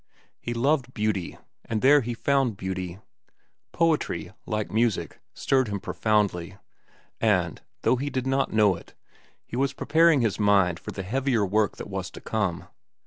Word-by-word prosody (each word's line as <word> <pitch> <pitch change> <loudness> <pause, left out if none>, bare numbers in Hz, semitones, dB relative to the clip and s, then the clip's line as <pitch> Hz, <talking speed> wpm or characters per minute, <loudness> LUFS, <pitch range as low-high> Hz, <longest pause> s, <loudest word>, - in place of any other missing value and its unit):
He 120 - -4
loved 130 +1 +1
beauty, 105 -4 -1 0.3
and 110 -1 -3
there 145 +2 +7
he 120 0 -4
found 135 -4 +1
beauty. 95 -1 -4 0.7
Poetry, 165 -2 0 0.2
like 105 -1 -2
music, 110 -2 0 0.2
stirred 130 -2 +2
him 100 -1 -3
profoundly, 100 -4 0 0.6
and, - - +1 0.2
though 130 - +3
he 140 +3 -2
did 130 -2 -2
not 135 +1 +1
know 105 -3 +4
it, 85 - -14 0.5
he - - -8
was 135 +2 +1
preparing 160 0 +4
his 110 -3 0
mind 100 -4 +3
for - - -9
the 95 - -5
heavier 125 +1 +1
work 105 +2 +1
that - - -7
was 95 -2 -4
to - - -11
come. 95 -5 -2
110 Hz, 155 wpm, -26 LUFS, 100-130 Hz, 0.7 s, there